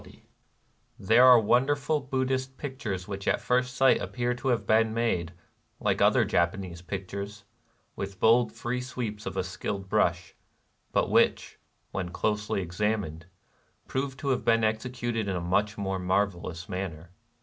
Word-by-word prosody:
260 - - -18 0.7
NIRVANA - - -12
There 120 +3 +7
are 125 -2 +9
wonderful 140 +7 +2
Buddhist 130 -1 -2
pictures 110 -10 -5
which 100 -1 -6
at - - +2
first 125 0 0
sight 135 -1 +4
appear 120 0 -1
to 120 +2 -5
have 115 -5 +1
been 110 +1 +3
made, 90 -8 0 0.5
like - - 0
other - - +5
Japanese 85 +1 -1
pictures, 100 +2 -6 0.5
with 95 -1 -6
bold 115 +1 +4
free 125 +1 -3
sweeps 115 -4 -5
of - - -5
a - - +1
skilled 95 +1 -5
brush, 85 -5 +1 0.6
but - - +1
which, - - +2 0.3
when 95 -2 -3
closely 105 +1 -1
ex 85 +2 -10
amined, 105 -7 -1 0.6
prove 135 0 -3
to 140 - -3
have 130 - +1
been 115 -1 +3
executed 115 0 -1
in 95 - -1
a - - -1
much 100 +4 0
more 95 -2 -2
marvelous 90 -2 -1
manner. 90 -4 -5
105 Hz, 155 wpm, -28 LUFS, 95-125 Hz, 0.7 s, are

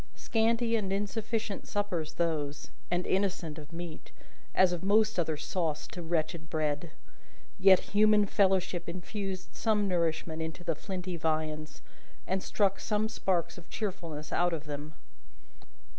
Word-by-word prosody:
Scanty 230 +1 +2
and 200 -4 0
insufficient 210 +1 -2
suppers 185 -7 -1
those, 150 -4 -1 0.2
and 175 +1 0
innocent 185 -5 0
of 150 0 -11
meat, 165 -1 -7 0.4
as 185 -1 +5
of 175 - -3
most 215 +1 +4
other 160 -3 0
sauce 155 -1 -1
to 175 - -6
wretched 160 -1 -1
bread. 155 0 -1 0.7
Yet, 190 -1 +8 0.2
human 210 0 +6
fellowship 190 -3 +2
infused 185 +1 -4
some 210 -2 +2
nourishment 165 -2 0
into 160 +2 -5
the 165 - +1
flinty 180 +2 -4
viands, 155 -1 -2 0.4
and 190 +1 0
struck 195 -1 +1
some 215 0 0
sparks 185 -5 0
of 170 - -17
cheerfulness 170 -8 -4
out 175 0 +2
of 155 -2 -3
them. 150 0 -6
180 Hz, 135 wpm, -31 LUFS, 160-200 Hz, 0.7 s, Yet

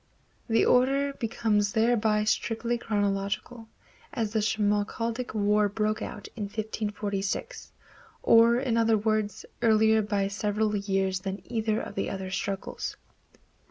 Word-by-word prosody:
The 225 - +3
order 275 +3 +3
becomes 220 -4 0
thereby 220 -2 +2
strictly 225 +2 0
chronological, 205 +2 -2 0.4
as 220 -2 -2
the 220 - +2
Schmalkaldic 220 +3 -1
War 210 0 +2
broke 215 +1 -1
out 205 - -6
in 215 -3 -3
1546; 210 - -4 0.5
or, 230 +1 +6
in 250 -3 0
other 225 -1 +3
words, 215 -1 -1 0.2
earlier 220 -1 +4
by 205 -2 0
several 210 +1 -1
years 195 -2 0
than 195 +1 -5
either 220 -2 -1
of - - -6
the - - -2
other 190 -1 -5
struggles. 195 0 -4
215 Hz, 125 wpm, -27 LUFS, 205-225 Hz, 0.5 s, or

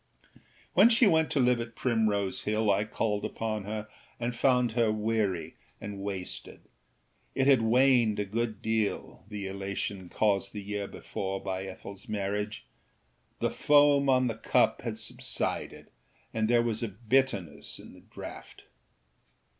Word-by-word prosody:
When 235 - +7
she 235 +1 +5
went 160 -5 +4
to 145 - 0
live 125 -1 +4
at 115 0 -7
Primrose 105 -6 0
Hill 110 0 +2
I 100 +2 +2
called 105 -1 -1
upon 110 -3 -3
her 105 +1 -4 0.3
and 120 0 -2
found 125 -2 +3
her 115 -1 +2
weary 105 -6 -1 0.2
and 105 -1 -6
wasted. 95 -2 -5 0.7
It 135 - +2
had 135 -4 +6
waned 120 -1 +4
a 105 - -1
good 110 +1 -3
deal, 110 -1 -1
the 105 -2 -5
elation 95 -1 -4
caused 100 -1 +1
the 105 -2 -6
year 100 0 -3
before 95 +11 -4
by 95 0 -4
Ethelâs 95 +1 -10
marriage; 105 +1 -3 0.7
the - - 0
foam 145 -1 +4
on 130 -1 +4
the 120 - 0
cup 110 - +2
had - - -4
subsided - - -3 0.4
and 110 0 0
there 120 -1 +4
was 115 -1 -1
a 115 - -1
bitterness 110 - -1
in - - -12
the - - -15
draught. - - -10
110 Hz, 145 wpm, -29 LUFS, 100-120 Hz, 0.7 s, When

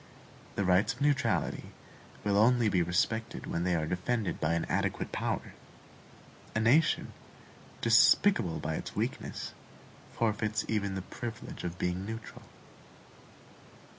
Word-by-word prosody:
The 100 - 0
rights 90 +2 +3
of - - -15
neutrality 145 -2 +1 0.5
will 100 0 +1
only 115 +2 +4
be 90 -3 +2
respected 100 +6 -1
when 85 - -2
they 90 -1 +1
are 80 -2 0
defended 95 +6 -2
by 80 +2 +2
an 85 - -1
adequate - - -1
power. - - -3 1.0
A - - +2
nation, 135 +9 +3 0.7
despicable 115 - +5
by 80 - -2
its - - -7
weakness, - - -3 0.6
forfeits 110 -1 0
even 100 -3 -1
the 95 - -4
privilege 115 +2 -7
of 90 0 -4
being 90 +1 -1
neutral. 110 +2 -7
105 Hz, 125 wpm, -31 LUFS, 90-115 Hz, 1.0 s, despicable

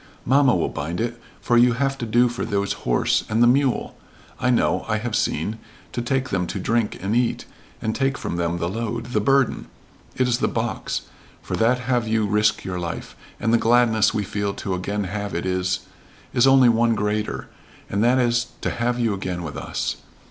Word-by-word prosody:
"Mamma 135 -2 +4
will 85 - +1
bind 80 +5 -4
it, 120 +1 -3 0.2
for 120 - +2
you 120 0 +5
have 135 +3 0
to 120 - -3
do 120 +3 +4
for 120 0 -4
those 100 0 -1 0.2
horse - - +2
and 110 +2 +3
the - - +7
mule. 130 +1 +2 0.4
I 130 - +1
know 125 - +2
I 110 -1 +1
have 115 0 -3
seen 105 +9 -1 0.3
to 120 - -3
take 130 +2 -1
them 90 -2 -1
to 100 - -4
drink 115 +3 0
and 100 +3 0
eat, 120 0 0 0.4
and 110 - 0
take 135 +1 0
from - - -4
them 85 0 -1
the 85 0 -1
load 115 +4 -3
the 105 - +3
burden. 135 +4 +2 0.5
It 130 - +2
is 120 0 +1
the - - +2
box 115 0 -2 0.4
for - - -3
that 125 +3 +2
have 125 -2 0
you 110 -1 +1
risk 105 +1 +2
your 90 -1 -4
life, 85 -2 -5 0.2
and 115 -1 +1
the 115 - +5
gladness 115 -2 +4
we 105 - -1
feel 100 0 -2
to 95 - -3
again 100 +3 -2
have 100 +1 -4
it 85 - -2
is 90 0 0 0.5
is 120 - +4
only 135 -2 +6
one 115 0 +3
greater 105 0 -2 0.4
and 100 +2 0
that 125 +2 +4
is 120 -1 +2
to - - -1
have 120 +1 -1
you 115 -3 +1
again 90 -2 -4
with 75 -4 -6
us. - - -3
115 Hz, 205 wpm, -23 LUFS, 100-120 Hz, 0.5 s, the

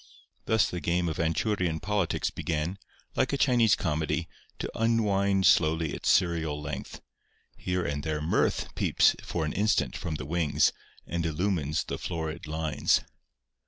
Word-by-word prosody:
Thus 110 -5 +3
the 90 - -4
game 85 +1 0
of 80 - -4
Anchurian 85 0 0
politics 100 -3 -1
began, 85 +4 -3 0.4
like 130 +1 +1
a - - +1
Chinese 120 -7 +4
comedy, 80 -2 -1 0.3
to - - -4
unwind 100 -4 +2
slowly 80 0 +3
its - - -2
serial 80 -5 +2
length. 70 -1 -6 0.5
Here 90 0 -2
and 70 0 -2
there 80 -1 -1
Mirth 75 +3 0
peeps - - +3
for 80 -2 -2
an 75 - -3
instant 105 +3 +1
from 80 -2 -4
the 65 - -5
wings 80 0 +2 0.3
and 85 0 -2
illumines 80 -2 0
the - - -5
florid 80 -2 -4
lines. 80 0 +1
85 Hz, 145 wpm, -28 LUFS, 80-100 Hz, 0.5 s, Chinese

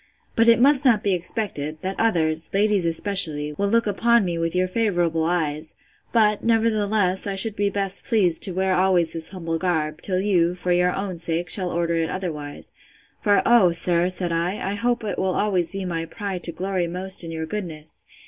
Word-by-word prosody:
But 230 +1 +3
it 230 -1 +6
must 275 +2 +4
not 235 -6 +3
be 200 - +1
expected, 170 -4 -2
that 190 +1 -2
others, 160 -7 +2
ladies 205 -3 +2
especially, 165 -4 +2
will 200 +6 -2
look 230 +3 +2
upon 230 +2 +2
me 175 -1 -2
with 165 +1 -2
your 185 0 +1
favourable 175 -6 0
eyes: 155 -2 -2 0.4
but, 210 -3 +2
nevertheless, 215 -4 +1
I 200 - -3
should 210 +2 +4
be 205 -1 0
best 195 -1 0
pleased 190 -8 +1
to 190 - +1
wear 190 +1 0
always 180 -3 +2
this 165 -1 -1
humble 165 -4 -4
garb, 160 -4 -2
till 185 -2 0
you, 180 -3 +1
for 180 0 -3
your 180 0 +2
own 190 -3 -5
sake, 165 +1 0
shall 185 -3 +2
order 170 -1 -1
it 165 -1 -1
otherwise: 150 -6 -6 0.5
for, 205 -2 +2
oh, 235 -7 +5
sir, 170 +1 +2
said 180 -1 0
I, 180 +4 -2
I - - -2
hope 235 +2 -1
it 210 - -4
will 190 -1 0
be - - -2
always 185 -5 0
my 175 -4 -3
pride 195 +1 -6
to 170 - +1
glory 185 0 -3
most 185 +2 -1
in 165 - -7
your 160 -1 -5
goodness! 160 -4 -6
185 Hz, 195 wpm, -22 LUFS, 165-205 Hz, 0.5 s, it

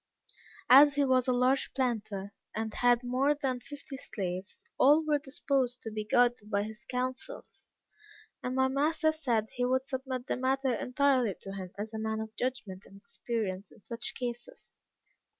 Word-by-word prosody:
As 285 +2 +9
he 285 -1 +3
was 255 -1 +3
a - - +3
large 255 +2 +2
planter, 215 -6 -2 0.2
and 220 0 -3
had 245 0 +3
more 260 +4 +2
than 265 -4 -2
fifty 285 +1 -9
slaves, 185 -5 -5 0.2
all 300 +4 +6
were 300 -1 +2
disposed 270 -3 -1
to 225 - -5
be 215 0 -4
guided 240 -1 +2
by 200 -1 +1
his 215 +1 -8
counsels, 255 - -5 0.7
and 250 +1 -3
my 265 0 +3
master 310 +4 +2
said 240 -9 -1
he 245 - -2
would 260 +1 +1
submit 260 -2 -4
the - - -2
matter 265 0 +1
entirely 255 -4 +2
to 195 - -7
him 190 -2 -6
as 215 +2 -5
a 220 - -4
man 220 0 -2
of 220 0 -6
judgment 245 -7 -3
and 195 - -15
experience 200 -2 -4
in 210 - -19
such 235 0 -5
cases. 245 - -7
250 Hz, 170 wpm, -30 LUFS, 220-270 Hz, 0.7 s, As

